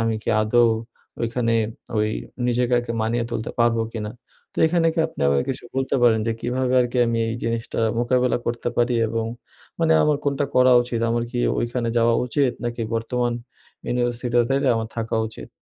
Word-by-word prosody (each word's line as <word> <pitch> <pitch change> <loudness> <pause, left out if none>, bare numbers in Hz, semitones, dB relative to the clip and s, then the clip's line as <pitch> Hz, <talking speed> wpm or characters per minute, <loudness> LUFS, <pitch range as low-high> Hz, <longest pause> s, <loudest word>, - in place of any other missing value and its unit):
আমি 115 0 +1
কি - - -6
আদৌ 120 +2 +4 0.5
ওইখানে 115 0 0 0.4
ওই 105 0 +2 0.4
নিজেকে 120 -1 +1
মানিয়ে 115 +2 0
তুলতে 110 - -3
পারবো 115 -1 +3
কিনা। 105 -2 -4 0.4
তো - - -9
এখানে 165 0 +2
কি - - -4
আপনি 160 - -11
আমাকে 70 -1 +2
কিছু 130 - -5
বলতে 135 0 0
পারেন, 115 -2 +5
যে 115 - +1
কিভাবে 125 +1 -1
আরকি 125 0 0
আমি 115 0 0
এই 115 - -2
জিনিসটা 115 0 -3 0.2
মোকাবেলা 125 0 +2
করতে 120 0 -1
পারি? 120 +1 +2
এবং 115 0 -2 0.6
মানে 165 -1 +4
আমার 150 -1 +3
কোনটা 145 0 0
করা 130 0 +6
উচিত? 120 -1 -3
আমার 120 0 0
কি 125 - -3 0.2
ঐখানে 120 0 -1
যাওয়া 115 0 +3
উচিত? 130 0 +1
নাকি 120 0 -3
বর্তমান 120 +1 -1 0.5
ইউনিভার্সিটি 120 0 -1 0.2
টাতে 135 +1 +1
আমার 110 -1 -2
থাকা 115 -1 -2
উচিত? 65 - -10
120 Hz, 175 wpm, -23 LUFS, 115-125 Hz, 0.6 s, করা